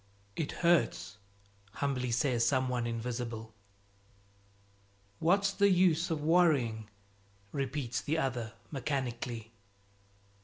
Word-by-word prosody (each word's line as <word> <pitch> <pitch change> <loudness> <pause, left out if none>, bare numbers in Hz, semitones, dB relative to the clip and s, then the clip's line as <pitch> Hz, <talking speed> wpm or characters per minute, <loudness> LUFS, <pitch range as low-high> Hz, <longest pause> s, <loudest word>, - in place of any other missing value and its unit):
"It 155 - -2
hurts!" 170 -10 +2 0.5
humbly 130 -3 -1
says 120 0 +1
some 130 +2 +2
one 120 -2 -1
invisible. 115 -1 -4 1.7
"What's 195 +4 +3
the 200 0 +4
use 180 -2 +3
of 155 -3 -2
worrying?" 140 -10 +3 0.6
repeats 130 -4 -2
the 155 +3 -1
other 125 -6 -2 0.2
mechanically. 120 -4 -3
130 Hz, 90 wpm, -32 LUFS, 115-160 Hz, 1.7 s, the